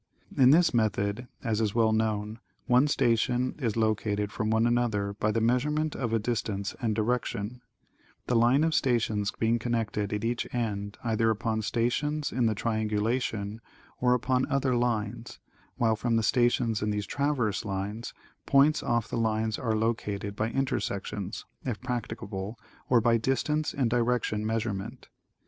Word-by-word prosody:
In 130 -1 +6
this 165 +2 +5
method, 110 0 0 0.2
as 115 -3 0
is 105 -1 0
well 115 -2 +4
known, 110 0 -1 0.3
one 125 +3 +4
station 125 -2 +1
is 115 -5 -1
located 105 -2 0
from 110 -1 -2
another 110 -3 +1
by 105 +1 0
the 115 - +1
measurement 150 +7 +1
of 120 -4 -2
a 115 - +3
distance 105 -3 -2
and 110 -3 0
direction, 115 0 -2 0.6
the 125 - 0
line 120 +6 +4
of 160 0 +1
stations 110 -7 +1
being 115 +1 +2
connected 110 -3 -1
at 105 0 -2
each 120 +1 -1
end 100 -3 -2
either 115 -1 +1
upon 110 0 0
stations 140 +7 -1
in 120 -2 +1
the 110 - +1
triangulation 110 0 -1 0.4
or 125 0 +4
upon 125 +1 +1
other 135 -2 +2
lines, 120 -1 -2 0.4
while 115 -2 +2
from 115 +1 0
the 115 - +2
stations 120 -1 +2
in 105 - 0
these 105 -1 -1
traverse 130 -4 0
lines, 105 +2 -4 0.4
points 140 +3 +4
off 115 -2 0
the 120 - -3
lines 110 -1 0
are 115 -3 0
located 105 -2 -2
by 110 +1 -1
intersections, 105 -6 -3 0.2
if 120 -5 -3
practicable, 115 -4 -4 0.3
or 120 -2 +5
by 115 +1 +4
distance 150 +6 0
and 130 -6 0
direction 120 -3 0
measurement. 110 +1 -3
115 Hz, 150 wpm, -28 LUFS, 105-125 Hz, 0.6 s, In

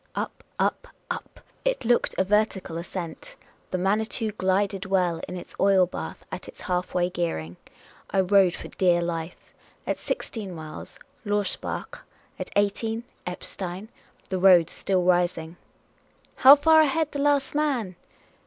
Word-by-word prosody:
Up, - - -4
up, - - 0 0.2
up; - - -7 0.2
it - - -1
looked 240 +1 +2
a - - +3
vertical 200 -3 0
ascent; 170 -1 -7 0.3
the 185 - -1
Manitou 215 +4 0
glided 195 0 0
well 180 -3 +1
in 180 - -6
its 175 - -10
oil 195 -2 +5
batli 175 - -6 0.2
at - - -6
its - - -12
half 180 -1 -2
way 175 -1 +3
gearing, 165 - -3 0.5
I 195 - +2
rode 190 -1 +4
for - - -9
dear 175 -2 +2
life. 165 0 -5 0.3
At - - -2
sixteen 200 -6 -4
miles, 155 -1 -9 0.3
Lorsbach; 205 -2 -2 0.4
at - - -4
eighteen, 220 +3 0 0.2
Eppstein; 180 +2 -5 0.4
the 185 - -1
road 180 -3 +6
still 185 -2 0
rising. 175 -2 +1 0.8
"How 270 +2 +10
far 315 +2 +6
ahead 310 +1 +1
the 285 - -3
last 285 -1 +2
man?" 270 -11 0
190 Hz, 140 wpm, -26 LUFS, 180-220 Hz, 0.8 s, How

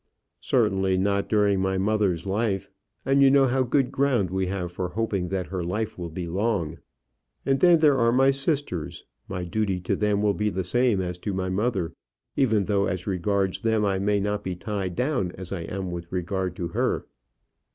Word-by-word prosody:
"Certainly 95 0 +1
not 100 +1 0
during 100 -3 +3
my 95 0 0
mother's 100 -3 +1
life; 100 0 -1 0.4
and 135 +1 +3
you 135 - +7
know 135 0 +5
how 130 +1 +1
good 130 +1 +1
ground 125 -10 +1
we 95 0 0
have 90 -2 -3
for 90 0 -3
hoping 100 -2 -1
that 95 0 -2
her 90 -1 -4
life 105 +6 -2
will 85 -2 -5
be 85 +2 -5
long. 85 -3 -1 0.7
And 135 0 +2
then 175 -2 +6
there 150 -4 +4
are 115 0 +4
my 135 +2 +4
sisters. 135 - -2 0.2
My 90 - -4
duty 95 +1 -1
to 85 - 0
them 105 -1 +1
will 105 -1 +3
be 105 +1 0
the 95 -2 -2
same 120 +1 +2
as 90 -1 -4
to 100 +1 -3
my 95 0 -2
mother, 95 -4 -1 0.4
even 110 -7 +2
though, 100 -1 +1
as 90 0 -3
regards 95 0 0
them, 110 -2 +1
I 95 -1 +1
may 100 +1 +1
not 105 +1 -2
be 95 -1 -3
tied 95 -1 -4
down 125 -10 0
as 95 0 -7
I 85 -3 -4
am 95 0 -4
with 85 -1 -7
regard 90 0 -2
to 85 -3 -4
her." - - -1
100 Hz, 195 wpm, -25 LUFS, 90-110 Hz, 0.7 s, you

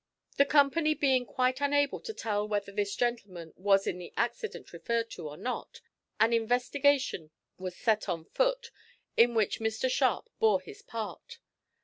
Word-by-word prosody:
The 280 - +6
company 305 +2 +3
being 260 -4 +2
quite 255 +1 0
unable 285 0 +2
to - - -6
tell 210 - -2
whether 205 -1 -2
this 200 0 -2
gentleman 200 -9 -3
was 195 +1 +3
in 180 - -2
the 175 - -9
accident 240 - -3
referred 230 -1 -2
to 155 - -6
or 145 - -10
not, 250 +7 -5 0.4
an 225 +2 +4
investigation 250 - +1 0.3
was 185 -1 -5
set 215 -2 +1
on 165 -3 -3
foot, - - 0 0.4
in 235 0 +5
which 215 -3 +1
Mr 220 +3 -1
Sharp 255 -1 +1
bore 215 -4 +4
his 180 -7 -12
part. 230 - -7
230 Hz, 155 wpm, -30 LUFS, 200-275 Hz, 0.4 s, The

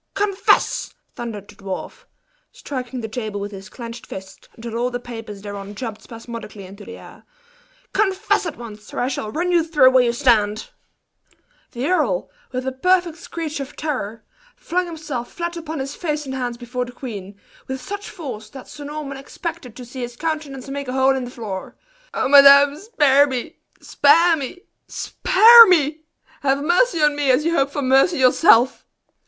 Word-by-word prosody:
"Confess!" 400 -1 +1 0.2
thundered 215 -4 -7
the - - -14
dwarf, 195 -1 -7 0.5
striking 255 -2 -6
the 220 - -4
table 220 -2 -5
with 205 +1 -5
his 195 0 -10
clinched 235 0 -9
fist, 190 0 -10
until 230 0 -7
all 240 +2 0
the 245 0 -4
papers 225 -4 -9
thereon 205 0 -7
jumped 225 -1 -6
spasmodically 230 -4 -9
into 200 +3 -12
the - - -10
air - - -14 0.7
"confess 405 -1 +1
at 325 - -6
once, 215 -3 -11
or - - -2
I 245 - +1
shall 215 -5 -4
run 350 +7 -1
you 345 -2 +3
through 295 -6 +5
where 255 -1 +5
you 240 - +2
stand!" 225 -4 +1 1.0
The 245 +1 -3
earl, 295 - 0 0.2
with 255 0 -4
a 265 - -1
perfect 350 +4 +1
screech 320 -4 -5
of 275 +1 -7
terror, 230 -8 -4 0.3
flung 360 +1 -2
himself 305 -7 -6
flat 345 0 -4
upon 320 -1 -6
his 275 +1 -4
face 300 -3 -3
and 265 - -5
hands 245 -2 -3
before 245 +1 -4
the 245 - -10
queen, 200 -6 -8 0.3
with 265 0 -4
such 405 +9 -7
force, 240 - -8
that 265 +2 -11
Sir 290 - -10
Norman 290 -2 -6
expected 270 -3 -7
to 250 - -9
see 255 +2 -10
his 240 0 -6
countenance 300 -3 -4
make 280 0 -5
a 250 - -4
hole 265 0 +3
in 260 -2 -3
the - - -7
floor. 215 -6 -7 0.4
"O - - 0
madame! 280 +1 +8
spare 290 - +3
me! 265 +5 -5 0.2
spare 330 +4 +4
me! 310 +5 -6 0.3
spare 460 +4 +7
me! 315 -3 +2 0.4
Have 275 0 +1
mercy 350 +1 +2
on 295 -1 +3
me 290 -2 0
as 260 +4 +3
you 335 - +1
hope 275 -3 +2
for 285 0 -4
mercy 270 +7 +3
yourself!" 255 -1 +4
265 Hz, 180 wpm, -21 LUFS, 235-315 Hz, 1.0 s, madame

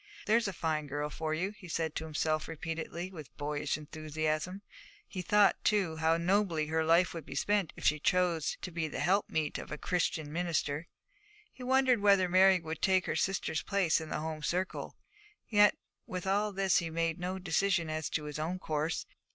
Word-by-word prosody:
'There's 225 +1 +3
a - - -1
fine 155 -4 -2
girl 145 +1 -3
for 155 +1 -3
you,' 185 +5 -1
he 195 -4 -12
said 160 -2 -2
to 160 - -4
himself 155 0 -1
repeatedly, 165 +2 -5
with 150 -9 -11
boyish 145 0 -2
enthusiasm. 155 +4 -3 0.4
He 185 - -5
thought, 205 +2 +3
too, 190 -7 +1
how 160 +1 +3
nobly 175 -2 +1
her 160 +1 0
life 170 +3 +4
would 165 -2 -6
be 135 - -9
spent 200 +2 +1
if - - -8
she 150 - +4
chose 175 -1 +1
to 185 - -4
be 165 -1 -2
the - - -6
helpmeet 175 -5 +1
of - - -9
a 150 - -3
Christian 160 -3 -1
minister. 165 -2 -1 0.7
He - - -14
wondered 255 -2 +3
whether 200 -2 +5
Mary 185 +1 +6
could 160 -1 -6
take 185 -2 +3
her - - -1
sister's 185 -4 0
place 190 -5 +1
in 160 - -7
the - - -2
home 155 -1 -4
circle. 180 +5 -2 0.5
Yet 205 -2 +5 0.3
with 180 0 -4
all 205 +2 +1
this 195 -2 +2
he 170 - -3
made 165 0 -1
no 180 +2 -3
decision 185 -1 +1
as 155 0 -3
to 150 - -2
his 150 0 -5
own 165 +4 -2
course. 155 -2 -2
165 Hz, 190 wpm, -32 LUFS, 155-190 Hz, 0.7 s, Mary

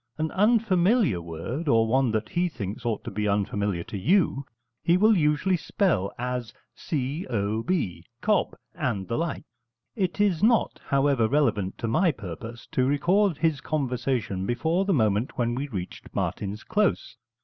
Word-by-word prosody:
An 155 0 -1
unfamiliar 205 - +3
word, 85 - -5
or 115 -4 +4
one 130 +2 +2
that 110 -1 -1
he 175 +1 0
thinks 110 - -5
ought 110 -3 -1
to - - -6
be 105 +1 -1
unfamiliar 100 -2 0
to 100 - -6
you, 160 - +2 0.4
he 170 +1 +3
will 215 +3 +5
usually 160 +3 +2
spell 160 - 0
as 125 -1 -4 0.2
c 145 +3 -3
o 110 -2 -1
b 110 - -2 0.2
cob, 215 -1 +1 0.2
and 120 - -2
the 115 - -2
like. 170 0 -2 0.5
It 190 -3 -1
is 195 -6 +2
not, 230 +1 +2
however, 135 -4 +2
relevant 110 -9 +1
to 115 - -3
my 170 +10 +3
purpose 110 - -8
to 130 0 +2
record 175 +5 +2
his 160 -3 +1
conversation 125 -9 -1
before 160 +10 0
the 195 - +1
moment 110 -1 +1
when 120 -1 +1
we 135 +4 -3
reached 95 -9 -7
Martin's 105 +2 -3
Close. 210 -2 0
130 Hz, 160 wpm, -26 LUFS, 105-175 Hz, 0.5 s, will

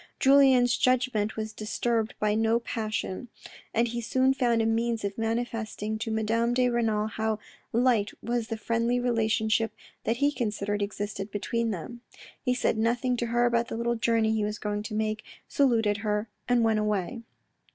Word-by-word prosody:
Julien's 265 -3 +5
judgment 250 -4 +1
was 220 0 -4
disturbed 220 +1 -1
by 210 0 +2
no 225 +1 +2
passion, 220 -2 -3 0.4
and 230 +1 +2
he 235 +1 -3
soon 260 +3 +2
found 245 -4 +2
a 225 - +2
means 230 0 0
of 200 0 -3
manifesting 225 -2 -2
to 225 +1 -3
Madame 225 +2 +1
de 250 0 +3
Renal 225 -3 +1
how 220 0 -1 0.3
light 235 -3 +3
was 235 -1 -2
the 225 - -3
friendly 230 +2 0
relationship 225 -2 +1 0.3
that 230 - +1
he 285 +2 +3
considered 205 -5 -2
existed 205 0 -4
between 230 +3 -1
them. 225 +5 -6 0.4
He 250 -1 +1
said 225 - 0
nothing 245 +3 +1
to 235 - -1
her 240 +1 +2
about 235 -1 +2
the - - -4
little 235 +1 0
journey 230 -1 +2
that - - +1
he 215 - 0
was 210 0 -2
going 210 0 -2
to 215 +1 -6
make; 215 0 -1 0.2
saluted 225 -7 +2
her, 210 0 -1 0.2
and 245 -1 +4
went 220 -1 +3
away. 210 +2 -1
225 Hz, 170 wpm, -28 LUFS, 215-240 Hz, 0.4 s, Julien's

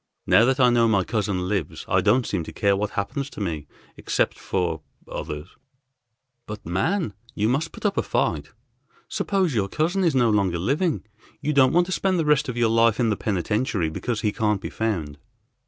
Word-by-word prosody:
Now 115 - +5
that 130 +2 +1
I 125 -2 +6
know 120 -1 +4
my 100 -4 +3
cousin 100 -4 -1
lives 95 -6 -3
I - - +2
don't 115 +4 +3
seem 90 -5 -2
to - - -8
care 100 -1 +2
what 105 +1 -1
happens 135 +8 -2
to - - -10
me, 80 -7 -3 0.3
except - - -1
for 85 -4 -2 0.3
others." 75 +4 -6 1.0
"But 105 0 -8
man! 110 - 0 0.2
You 105 0 +1
must 140 +7 0
put - - -10
up 200 - +1
a - - +3
fight. - - -1 0.6
Suppose 190 -6 0
your 100 -4 0
cousin 175 - 0
is 165 -6 +2
no 120 -3 +4
longer 95 -4 +1
living; 145 - 0 0.4
you 150 +1 -1
don't 130 -2 +5
want 175 +1 +4
to 185 - -7
spend 185 0 +1
the 165 - 0
rest 150 -1 +2
of 120 - -4
your 120 -1 +3
life 115 -1 +3
in 115 -3 +2
the - - +1
penitentiary 100 -2 -1
because 115 +6 -3
he 105 - +1
can't 105 -1 0
be - - -6
found." 85 -11 -2
110 Hz, 200 wpm, -24 LUFS, 100-140 Hz, 1.0 s, I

